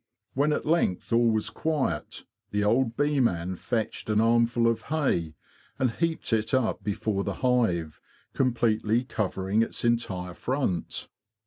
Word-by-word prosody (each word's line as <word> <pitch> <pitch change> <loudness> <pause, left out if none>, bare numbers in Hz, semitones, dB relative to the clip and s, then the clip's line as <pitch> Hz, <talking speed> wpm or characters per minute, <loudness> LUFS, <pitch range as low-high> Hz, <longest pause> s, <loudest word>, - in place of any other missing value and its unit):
When 145 +3 +2
at - - -1
length 150 - +1
all 115 0 +4
was 110 -1 0
quiet, 145 - -2 0.3
the 105 0 0
old 115 +2 +2
bee 145 0 +2
man 90 -6 +1
fetched 110 +3 -3
an 105 0 +3
armful 115 +1 +3
of 115 -1 +1
hay 90 - 0 0.4
and 130 -3 +1
heaped 160 -2 -1
it 110 +4 +1
up 130 -4 0
before 100 -1 -1
the - - -3
hive, 90 -11 +1 0.3
completely 115 -2 +1
covering 100 -2 -1
its 115 - -2
entire 95 -7 0
front. 125 - -2
115 Hz, 140 wpm, -27 LUFS, 100-125 Hz, 0.4 s, all